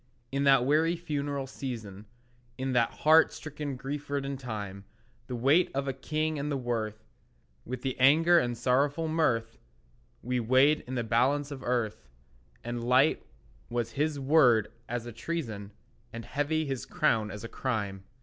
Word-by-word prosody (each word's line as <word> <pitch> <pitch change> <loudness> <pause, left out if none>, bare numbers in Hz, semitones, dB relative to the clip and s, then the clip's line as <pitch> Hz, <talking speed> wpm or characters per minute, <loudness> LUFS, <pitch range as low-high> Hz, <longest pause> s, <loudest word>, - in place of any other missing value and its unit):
In 140 +1 0
that 135 -3 +5
weary 160 +5 +3
funereal 145 -4 -3
season, 110 -7 -7 0.5
In 130 0 -2
that 120 -2 +3
heart 160 +1 +5
stricken 150 -2 -6
grief 140 +3 -6
ridden 140 -1 -2
time, 105 -6 -6 0.4
The 125 - -4
weight 140 +9 +3
of 140 0 -1
a 135 - -1
king 155 +3 -2
and 145 +1 -2
the 140 - 0
worth, 110 -4 -3 0.6
With 125 +1 -6
anger 165 +6 +6
and 120 -5 -2
sorrowful 140 +6 +1
mirth, 115 -8 0 0.6
We 125 +1 -1
weighed 130 +6 +4
in 130 - -4
the 120 - -1
balance 135 +6 +1
of 135 -2 -7
earth, 120 - -2 0.5
And 120 0 -4
light 130 +5 +3 0.5
was 120 -1 -2
his 150 +3 -1
word 130 -6 +4 0.2
as 120 0 -3
a 120 - -6
treason, 115 -6 -5 0.4
And 115 0 -7
heavy 150 +3 -1
his 135 -3 -4
crown 110 -2 +1
as 105 0 -8
a - - -4
crime. 100 -7 -3
130 Hz, 155 wpm, -29 LUFS, 115-145 Hz, 0.6 s, anger